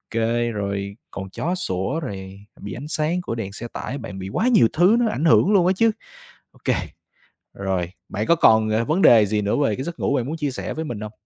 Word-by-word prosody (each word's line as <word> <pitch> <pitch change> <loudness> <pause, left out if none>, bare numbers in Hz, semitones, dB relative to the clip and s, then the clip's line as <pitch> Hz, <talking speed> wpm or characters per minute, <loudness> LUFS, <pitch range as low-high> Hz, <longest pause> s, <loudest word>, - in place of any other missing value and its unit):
OK, 115 - +1 0.3
rồi 100 -1 -3 0.2
còn 95 -1 -6
chó 175 - -2
sủa 95 - -2
rồi 100 -6 -7
bị 100 -2 -7
ánh 140 +5 -7
sáng 160 +3 -1
của 145 -10 -4
đèn 105 -4 -5
xe 120 +4 -6
tải. 135 - -5
Bạn 115 -7 -7
bị 95 +1 -6
quá 235 - +1
nhiều 220 - +5
thứ 180 +7 +5
nó 235 - +2
ảnh 160 - -2
hưởng 165 +4 +5
luôn 185 -4 +4
á 190 - +4
chứ. 225 +4 +3 0.6
OK - - -1 0.8
rồi, 95 -3 -2 0.2
bạn 105 +2 -2
có 170 - +4
còn, 110 -8 +4
ờ, 110 +2 +1
vấn 160 +9 +1
đề 115 - +7
gì 105 +1 0
nữa 100 0 0
về 110 -7 +1
cái 130 - -4
giấc 170 +3 -6
ngủ 140 - +1
bạn 125 -4 0
muốn 155 +5 -4
chia 145 -3 -2
sẻ - - -5
với 160 - -4
mình 120 -8 -5
hông? 105 0 -6
115 Hz, 240 wpm, -22 LUFS, 100-160 Hz, 0.8 s, đề